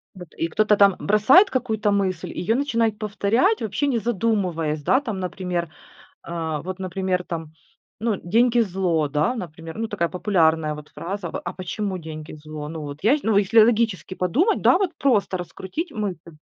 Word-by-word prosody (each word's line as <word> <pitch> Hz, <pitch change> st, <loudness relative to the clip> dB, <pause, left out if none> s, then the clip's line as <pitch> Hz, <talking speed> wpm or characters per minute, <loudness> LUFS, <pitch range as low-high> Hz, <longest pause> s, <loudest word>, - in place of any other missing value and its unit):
Вот. 180 Hz, -2 st, -10 dB
И 165 Hz, -, 0 dB
кто-то 210 Hz, +5 st, +3 dB
там 200 Hz, -2 st, +5 dB
бросает 235 Hz, -, +5 dB
какую-то 220 Hz, -5 st, 0 dB
мысль, 190 Hz, -4 st, -1 dB
ее 200 Hz, +6 st, -1 dB
начинает 230 Hz, -6 st, 0 dB
повторять, 215 Hz, -, +1 dB
вообще 225 Hz, +7 st, -1 dB
не 250 Hz, -4 st, +1 dB
задумываясь, 190 Hz, -9 st, -1 dB
да. 260 Hz, -, +3 dB
Там, 220 Hz, -8 st, -4 dB
например, 180 Hz, -2 st, -3 dB, 0.5 s
а, 160 Hz, -3 st, -3 dB
вот, 185 Hz, +2 st, -6 dB
например, 185 Hz, 0 st, -2 dB
там, 165 Hz, -3 st, -6 dB, 0.5 s
ну, 225 Hz, -2 st, 0 dB
деньги- 235 Hz, +6 st, +3 dB
зло, 180 Hz, -7 st, 0 dB
да, 150 Hz, -, +1 dB
например. 165 Hz, -, -8 dB
Ну, 225 Hz, 0 st, -2 dB
такая 170 Hz, -5 st, -1 dB
популярная 160 Hz, -5 st, +1 dB
вот 150 Hz, 0 st, -10 dB
фраза 185 Hz, -1 st, -5 dB
в -, -, -4 dB
А 175 Hz, -, -3 dB
почему 185 Hz, +1 st, -4 dB
деньги- 155 Hz, -2 st, -8 dB
зло? 155 Hz, 0 st, -8 dB
Ну, 160 Hz, 0 st, -6 dB
вот 145 Hz, -1 st, -7 dB
я 235 Hz, +8 st, +4 dB
счи -, -, -7 dB
ну, 220 Hz, -2 st, +2 dB
если 205 Hz, +3 st, +5 dB
логически 215 Hz, -7 st, +1 dB
подумать, 265 Hz, -, +1 dB
да, -, -, +5 dB
вот 385 Hz, -3 st, 0 dB
просто 215 Hz, -8 st, +2 dB
раскрутить 190 Hz, -, -5 dB
мысль. 185 Hz, -, -5 dB
190 Hz, 175 wpm, -23 LUFS, 170-225 Hz, 0.5 s, там